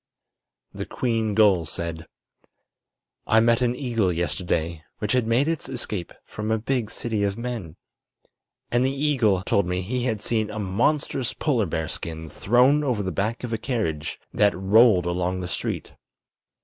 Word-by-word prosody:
The - - -5
queen 115 -4 -1
gull 100 -6 +4
said: 85 0 -5 1.2
"I 110 - +5
met 115 +1 +3
an 125 0 +2
eagle 115 -8 0
yesterday, 85 -2 -1
which 105 - -2
had 125 -3 +2
made 120 +6 +3
its 165 -4 -2
escape 110 -8 -3
from 105 +1 -5
a 110 - +2
big 115 0 -1
city 115 -2 -3
of 100 0 0
men. 115 -9 -5 1.0
And 120 +1 +3
the 130 - +2
eagle 135 -9 +1
told 100 -1 +1
me 90 +1 -1
he 125 +5 -2
had 110 -4 0
seen 110 +1 -1
a 105 - -6
monstrous 120 +6 0
polar 120 - +1
bear 80 0 -2
skin 80 0 -5
thrown 125 - +3
over 120 -7 0
the 95 - -2
back 110 +6 -2
of 120 -2 -3
a 110 - -1
carriage 105 - -2
that 100 -2 +3
rolled 100 -1 +5
along 90 +1 -1
the 90 - -4
street. - - -4
110 Hz, 160 wpm, -24 LUFS, 90-120 Hz, 1.2 s, I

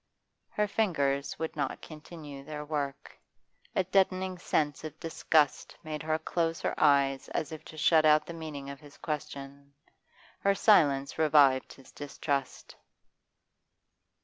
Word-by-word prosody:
Her 210 0 0
fingers 145 -10 0
would 160 - -4
not - - -2
continue 150 -3 -10
their 150 0 -6
work. 145 -2 -4 0.6
A 190 - +3
deadening 185 0 +1
sensation 150 -2 -1
of 155 - -14
disgust 155 -2 +1
made 155 -1 -5
her 155 0 0
close 165 +1 -1
her - - -1
eyes 135 -1 +3
as 155 - -3
if 155 - -8
to 155 - -11
shut 155 +1 +4
out 155 0 +5
the 170 - -7
meaning 155 -4 -7
of 140 - -10
his 145 0 -15
question. 140 -2 -6 0.6
Her 200 0 +2
silence 145 -11 +3
revived 145 -4 +4
his 135 - -17
distrust. 140 -1 -4
150 Hz, 135 wpm, -30 LUFS, 140-165 Hz, 0.6 s, out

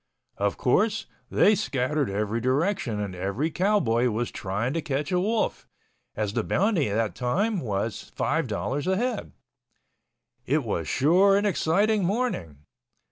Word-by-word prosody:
Of 100 0 0
course, 210 - +1 0.2
they 210 - +5
scattered 150 - 0
every 105 +3 -1
direction 130 - 0
and 100 -2 -3
every 100 - -2
cowboy 150 - +2
was 115 +2 -2
trying 105 +7 -2
to 165 - -1
catch 145 0 -2
a 180 - +2
wolf, 215 +4 -1 0.5
as 105 -2 -2
the - - 0
bounty 190 - +1
that 110 +1 0
time 190 - 0
was 110 - -3
$5.00 145 +5 -1
a 190 - +1
head. 240 0 -2 1.2
It 145 +2 +2
was 85 -8 -2
sure 185 +8 +4
an 205 - 0
exciting 205 +3 +2
morning. 175 - -2
145 Hz, 135 wpm, -26 LUFS, -, 1.2 s, they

